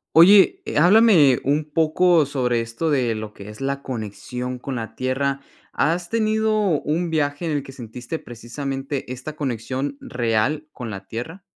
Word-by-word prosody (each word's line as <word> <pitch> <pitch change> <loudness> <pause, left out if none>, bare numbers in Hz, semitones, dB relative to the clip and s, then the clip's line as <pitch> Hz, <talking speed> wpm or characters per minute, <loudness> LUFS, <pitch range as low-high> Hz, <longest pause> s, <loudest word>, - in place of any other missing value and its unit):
Oye, 200 - +7
eh, - - -4
háblame 175 - +6
un 145 +3 +1
poco 165 0 +3
sobre 125 -4 0
esto 115 +8 -2
de 125 -5 +1
lo 110 -1 -6
que 100 -1 -11
es 105 +5 -10
la 140 +1 -2
conexión 125 +2 -5
con 135 +2 -5
la 110 -1 -6
tierra, 135 +3 -1 0.3
¿has 170 +3 0
tenido 220 -1 +1 0.3
un 170 +4 -1
viaje 150 0 -1
en 160 - -1
el 145 -1 -1
que 135 - -11
sentiste 125 +3 -7
precisamente 135 +3 -5
esta 130 +4 -6
conexión 130 +1 -3
real 125 +5 -1
con 120 -4 -6
la 100 -2 -8
tierra? 160 - -7
140 Hz, 160 wpm, -22 LUFS, 120-160 Hz, 0.3 s, Oye